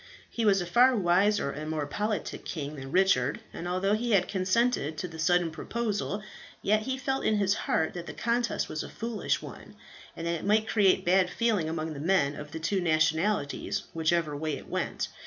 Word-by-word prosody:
He 230 Hz, -, -1 dB
was 195 Hz, -2 st, +4 dB
a -, -, -3 dB
far 245 Hz, +8 st, +5 dB
wiser 190 Hz, -3 st, +2 dB
and 155 Hz, +2 st, -6 dB
more 155 Hz, -2 st, -1 dB
politic 210 Hz, +8 st, -3 dB
king 150 Hz, -3 st, -5 dB
than 135 Hz, -1 st, -8 dB
Richard; 180 Hz, -9 st, +3 dB
and 175 Hz, -, -5 dB
although 185 Hz, +3 st, +1 dB
he 230 Hz, +2 st, 0 dB
had 185 Hz, -3 st, +4 dB
consented 190 Hz, -, +1 dB
to 180 Hz, -, -3 dB
the 160 Hz, -1 st, -10 dB
sudden 175 Hz, 0 st, +2 dB
proposal, 210 Hz, +2 st, -3 dB, 0.4 s
yet 215 Hz, +1 st, +3 dB
he 260 Hz, +4 st, -2 dB
felt 265 Hz, 0 st, -2 dB
in 215 Hz, -, +2 dB
his 200 Hz, -1 st, +2 dB
heart 160 Hz, -5 st, 0 dB
that 175 Hz, -1 st, -7 dB
the -, -, -6 dB
contest 235 Hz, +1 st, 0 dB
was 155 Hz, -, -4 dB
a -, -, -7 dB
foolish 230 Hz, -1 st, -2 dB
one, -, -, -10 dB, 0.4 s
and 165 Hz, -, -5 dB
that 170 Hz, -, 0 dB
it -, -, -10 dB
might 215 Hz, +2 st, +2 dB
create 200 Hz, -4 st, +3 dB
bad 180 Hz, +1 st, +4 dB
feeling 215 Hz, -9 st, 0 dB
among 160 Hz, 0 st, -3 dB
the 140 Hz, -, -7 dB
men 150 Hz, -3 st, +2 dB
of 150 Hz, 0 st, -8 dB
the 160 Hz, -, -5 dB
two 190 Hz, +4 st, 0 dB
nationalities 160 Hz, 0 st, +1 dB
whichever 160 Hz, -2 st, +1 dB
way 155 Hz, +1 st, -2 dB
it -, -, -12 dB
went. -, -, -2 dB
180 Hz, 200 wpm, -28 LUFS, 160-210 Hz, 0.4 s, far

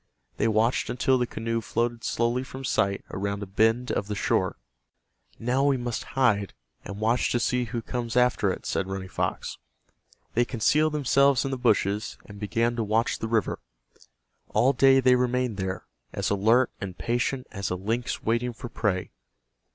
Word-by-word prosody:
They -, -, +2 dB
watched 110 Hz, +3 st, +1 dB
until 130 Hz, +1 st, +2 dB
the 125 Hz, -, 0 dB
canoe 115 Hz, +1 st, -2 dB
floated 120 Hz, +1 st, -2 dB
slowly 120 Hz, +2 st, 0 dB
from 130 Hz, +1 st, -9 dB
sight 100 Hz, -5 st, 0 dB
around 100 Hz, +1 st, -3 dB
a -, -, -4 dB
bend 115 Hz, +5 st, +1 dB
of 100 Hz, -, -1 dB
the 105 Hz, -, -3 dB
shore. 95 Hz, -1 st, 0 dB, 0.8 s
"Now 125 Hz, +4 st, 0 dB
we 140 Hz, -1 st, +3 dB
must 120 Hz, -2 st, -3 dB
hide, 105 Hz, -7 st, +2 dB, 0.3 s
and 100 Hz, 0 st, -7 dB
watch 115 Hz, +3 st, +1 dB
to 120 Hz, -, +1 dB
see 125 Hz, +1 st, +1 dB
who 115 Hz, 0 st, -4 dB
comes 120 Hz, -1 st, -3 dB
after 125 Hz, -5 st, +3 dB
it," -, -, -6 dB
said 95 Hz, -, -1 dB
Running 95 Hz, -1 st, -5 dB
Fox. -, -, -3 dB, 0.7 s
They 120 Hz, -, +3 dB
concealed 150 Hz, +7 st, +2 dB
themselves 140 Hz, -1 st, +3 dB
in 135 Hz, -, -2 dB
the -, -, 0 dB
bushes, 105 Hz, -4 st, +1 dB
and 100 Hz, -1 st, -11 dB
began 115 Hz, +3 st, 0 dB
to 115 Hz, -, 0 dB
watch 110 Hz, +2 st, 0 dB
the 110 Hz, -, -3 dB
river. 115 Hz, -1 st, 0 dB, 0.9 s
All 135 Hz, +3 st, +3 dB
day 135 Hz, +1 st, +5 dB
they 130 Hz, 0 st, +5 dB
remained 125 Hz, -3 st, +1 dB
there, 95 Hz, -1 st, -3 dB, 0.3 s
as -, -, -1 dB
alert 110 Hz, +5 st, +3 dB
and 95 Hz, -2 st, -5 dB
patient 120 Hz, +2 st, -1 dB
as 100 Hz, -2 st, -3 dB
a 90 Hz, -, -1 dB
lynx 110 Hz, +6 st, -2 dB
waiting 120 Hz, +2 st, 0 dB
for 120 Hz, +1 st, -8 dB
prey. 100 Hz, -5 st, -1 dB
115 Hz, 175 wpm, -26 LUFS, 105-125 Hz, 0.9 s, day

